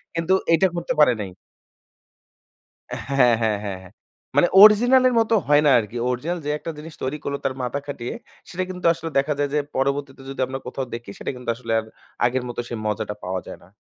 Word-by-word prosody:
কিন্তু 165 +2 +1 0.2
এইটা 180 +3 +5
করতে 170 - -2
পারে 125 -4 +6
নাই। 95 -3 -6 1.8
হ্যাঁ, 130 -3 +4
হ্যাঁ, 110 -2 +1
হ্যাঁ, 100 -2 -4
হ্যাঁ। 95 - -15 0.4
মানে - - +5
অরজিনাল 240 +5 +7
এর 255 - +1
মতো 225 0 +1
হয় 145 0 +5
না - - +6
আরকি। 115 +2 -6
অরজিনাল 155 +8 -2
যে - - -2
একটা 165 - -6
জিনিস 155 +1 -9
তৈরি 130 +3 -2
করলো 140 0 -2
তার 135 - +1
মাথা 125 +3 -2
খাটিয়ে 140 -4 -5 0.3
সেইটা 185 +1 -3
কিন্তু 180 -1 -8
আসলে 165 0 -6
দেখা 140 +2 +2
যায় 145 0 +1
যে 150 - +2 0.2
পরবর্তীতে 135 0 -1
যদি 135 - -8
আমরা 135 0 -5
কোথাও 130 +1 -4
দেখি, 115 -2 -7
সেইটা - - -4
কিন্তু 125 -1 -7
আসলে 115 -1 -7
আর 110 - -7 0.4
আগের 125 +1 0
মতো 120 - -6
সেই 120 - -5
মজাটা 105 0 -2
পাওয়া 90 0 -3
যায় - - -8
না। - - -19
135 Hz, 205 wpm, -23 LUFS, 120-165 Hz, 1.8 s, অরজিনাল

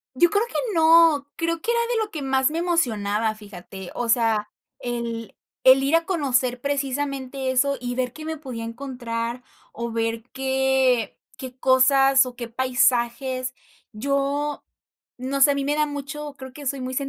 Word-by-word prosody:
Yo 345 +6 +4
creo 415 +2 +2
que 475 - -15 0.2
no, 320 -3 +5
creo 335 0 -1
que 455 - -2
era 470 0 +2
de 450 -2 +1
lo 420 - -11
que 310 -6 -5
más 265 0 +2
me 320 - -3
emocionaba, 225 - 0
fíjate, 195 -3 -10
o 245 - -3
sea, 225 -3 +2 0.3
el 235 -2 -4 0.3
el 265 +1 +7
ir 280 +4 +3
a 330 0 0
conocer 260 -8 0
precisamente 275 -1 -2
eso 275 +2 +2
y 245 0 -4
ver 250 -1 -2
qué 310 - -9
me 320 0 -4
podía 255 -6 -6
encontrar, 235 -1 -5 0.3
o 235 0 -4
ver 225 0 -1
qué 265 -3 +1 0.2
qué 255 -1 -8
cosas 270 +1 +5
o 250 -1 -8
qué 235 -1 -6
paisajes. 250 +1 0 0.4
Yo, 280 +5 -1 0.5
no 270 +2 -3
sé, 285 +2 +7
a - - -1
mí 280 0 -2
me 290 +2 0
da 300 0 +2
mucho, 290 0 -6
creo 260 -1 -10
que 285 +1 -10
soy 270 +1 -1
muy 255 0 -4
265 Hz, 170 wpm, -23 LUFS, 240-285 Hz, 0.5 s, el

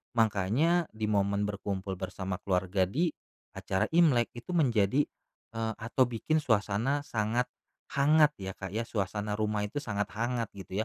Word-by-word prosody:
makanya 115 - +2
di 110 0 -2
momen 100 0 +2
berkumpul 100 -2 -3
bersama 95 0 -4
keluarga 95 0 +1
di 160 - +1 0.5
acara 95 - 0
Imlek, 155 -9 +4
itu 120 +10 -6
menjadi, 120 - +3 0.5
eee, 115 -1 -2
atau 115 +4 +1
bikin 125 +6 0
suasana 115 +2 +1
sangat 115 0 0 0.4
hangat 150 +2 +5
ya, 95 -1 -5
Kak, 95 -2 -6
ya, 115 +3 -2
suasana 105 0 -2
rumah 105 -1 0
itu 105 - -19
sangat 105 -4 -1
hangat 120 +1 -1
gitu 95 0 -5
110 Hz, 145 wpm, -30 LUFS, 100-125 Hz, 0.5 s, hangat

